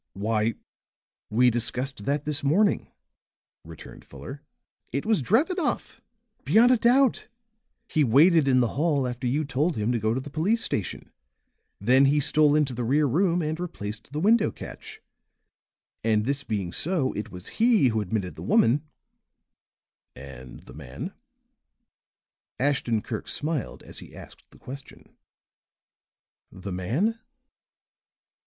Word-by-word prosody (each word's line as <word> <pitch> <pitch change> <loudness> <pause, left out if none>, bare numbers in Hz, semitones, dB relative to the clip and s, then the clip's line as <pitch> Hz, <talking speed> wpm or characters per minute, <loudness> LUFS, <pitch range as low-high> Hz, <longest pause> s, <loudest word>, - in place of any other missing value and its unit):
"Why, 110 +2 -1 0.7
we 125 +3 +4
discussed 120 0 -2
that 145 +1 -1
this 150 -1 0
morning," 195 +9 +2 0.8
returned 80 -1 -12
Fuller. - - -10 0.5
"It 140 +3 -3
was 220 -7 +2
Drevenoff, 300 - 0 0.4
beyond 235 +3 +5
a 255 - +5
doubt! 245 +2 +3 0.6
He 155 - +1
waited 145 +5 +5
in 130 -1 +4
the 120 - +1
hall 145 -5 +1
after 125 +1 -4
you 145 +5 0
told 145 +5 0
him 105 +3 0
to 120 - 0
go 110 +2 0
to - - -1
the 140 +2 -9
police 195 +10 +1
station. 100 -5 -3 0.7
Then 130 +6 +4
he 145 +2 +3
stole 150 +1 +3
into 150 -4 +1
the 120 0 -3
rear 145 +6 +2
room 170 +5 +1
and 155 +2 -3
replaced 110 -12 -6
the 150 - -3
window 215 +5 +3
catch. - - -10 1.0
And 110 -1 +1
this 140 +2 -1
being 100 -8 -3
so 155 - 0
it 105 +1 -5
was 90 -2 -9
he 225 - +5
who 110 -1 -1
admitted 100 -2 -3
the - - -11
woman 125 +6 +3 0.7
" - - -61 0.2
"And 65 0 -12
the - - -14
man?" 60 - -8 1.5
Ashton 130 -5 0
Kirk 110 - -5
smiled 150 -4 -3
as - - -11
he - - -13
asked - - -14
the - - -19
question. 135 +2 -11 1.4
"The 95 +1 -8
man?" 135 - -1
140 Hz, 140 wpm, -26 LUFS, 115-160 Hz, 1.5 s, beyond